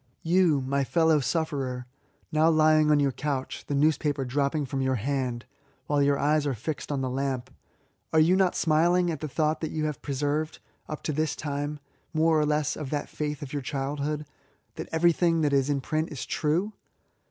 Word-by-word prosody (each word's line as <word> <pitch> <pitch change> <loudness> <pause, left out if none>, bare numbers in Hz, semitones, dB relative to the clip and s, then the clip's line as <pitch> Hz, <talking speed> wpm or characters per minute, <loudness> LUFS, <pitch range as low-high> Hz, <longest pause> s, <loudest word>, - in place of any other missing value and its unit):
You, 165 -4 +3
my 140 +2 0
fellow 160 +2 +3
sufferer, 135 -4 -2 0.5
now 155 +1 +4
lying 155 -1 +4
on 150 -1 +5
your 140 -1 +2
couch, 135 0 -4
the 145 - -1
newspaper 145 -1 +1
dropping 140 +3 0
iirom 135 0 -2
your 130 0 +1
hand, 125 0 -2 0.4
while 145 +1 +1
your 140 0 +3
eyes 150 +1 +2
are 135 - 0
fixed 150 +7 -5
on 140 -2 -1
the 130 - -1
lamp, 130 -1 -3 0.6
are 160 - +4
you 165 +4 +5
not 190 -2 +2
smiling 170 +2 +3
at 155 - -4
the 155 - -4
thought 155 +2 0
that 160 - -2
you 155 -1 -2
have 150 -3 -3
preserved, 145 +3 -2 0.3
yxp 155 - -6
to 155 - -1
this 155 +2 0
time, 145 0 -3 0.4
more 160 0 +4
or 150 - +2
less 150 -1 0
of 150 -4 -5
that 145 0 -3
faith 150 0 -4
of 135 - -8
your 145 - -2
childhood 145 +2 -3 0.2
— - - -41
that - - -6
everything 165 0 +3
that 145 -2 +1
is 135 0 +2
in 140 -1 0
print 155 +3 -2
is 145 - -5
true 170 +8 0
150 Hz, 195 wpm, -27 LUFS, 140-155 Hz, 0.6 s, on